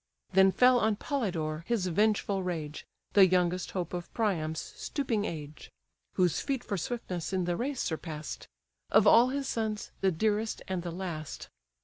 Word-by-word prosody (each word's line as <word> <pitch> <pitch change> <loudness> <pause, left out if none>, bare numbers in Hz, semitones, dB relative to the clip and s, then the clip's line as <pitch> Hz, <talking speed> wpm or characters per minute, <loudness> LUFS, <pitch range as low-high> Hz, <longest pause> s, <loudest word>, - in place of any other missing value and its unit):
Then 190 0 +6
fell 250 +4 +5
on 220 -1 +2
Polydore 175 - -2
his 230 -6 +1
vengeful 200 +1 +1
rage, 160 -5 -4 0.3
The 195 -1 +8
youngest 180 0 +1
hope 175 -2 -3
of 175 -1 -5
Priam's 160 -8 0
stooping 230 -8 -2
age: 150 -4 -7 0.4
(Whose 180 -3 +2
feet 270 -3 -2
for 205 - -3
swiftness 185 -3 -4
in 185 -2 +1
the 175 0 0
race 260 +5 -2
surpass'd:) 155 -1 -5 0.4
Of - - +5
all 240 +2 +7
his 275 0 -2
sons, 220 -2 -2
the 190 - +3
dearest, 215 +5 0
and 185 -2 -2
the 175 - -5
last. 170 -3 -6
190 Hz, 155 wpm, -30 LUFS, 170-220 Hz, 0.4 s, The